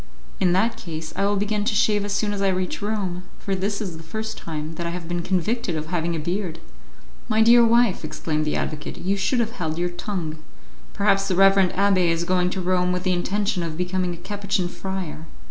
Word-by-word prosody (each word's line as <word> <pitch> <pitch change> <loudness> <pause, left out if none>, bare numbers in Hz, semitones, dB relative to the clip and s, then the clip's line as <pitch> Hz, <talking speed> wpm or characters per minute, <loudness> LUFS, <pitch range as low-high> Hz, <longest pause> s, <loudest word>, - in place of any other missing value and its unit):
"In 180 -2 +3
that 225 +5 +2
case, 160 -6 -6
I 200 - +1
will 205 - +2
begin 205 +1 0
to 215 0 0
shave 210 -1 +3
as 205 - -3
soon 205 +1 0
as 200 - -3
I 195 - +3
reach 185 -1 -1
Rome, 200 -4 -2 0.2
for 195 - -3
this 200 +2 -1
is 185 -7 -4
the - - -10
first 220 +7 -5
time 155 -1 -5
that 170 +1 -4
I - - -2
have 170 -1 -5
been 175 0 -2
convicted 185 +2 0
of 155 0 -3
having 170 0 -1
a - - -2
beard." 175 +1 -2 0.7
"My 220 0 +4
dear 235 +1 +7
wife," 230 -5 +4
exclaimed 155 0 -2
the 150 - 0
advocate, 150 -1 -3
"you 195 +2 0
should 205 +6 +1
have 230 -1 +1
held 160 -8 -3
your 175 +1 0
tongue; 175 -3 -4 0.6
perhaps 195 -1 +2
the 185 - +1
reverend 195 0 +5
abbé 195 -2 +3
is 165 0 +1
going 180 0 +2
to 190 +1 -3
Rome 180 0 +2
with 180 0 -1
the 185 - +2
intention 195 +1 0
of 165 -2 -4
becoming 180 0 -1
a - - -12
Capuchin 200 0 -2
friar." 180 -5 -5
185 Hz, 220 wpm, -24 LUFS, 170-205 Hz, 0.7 s, dear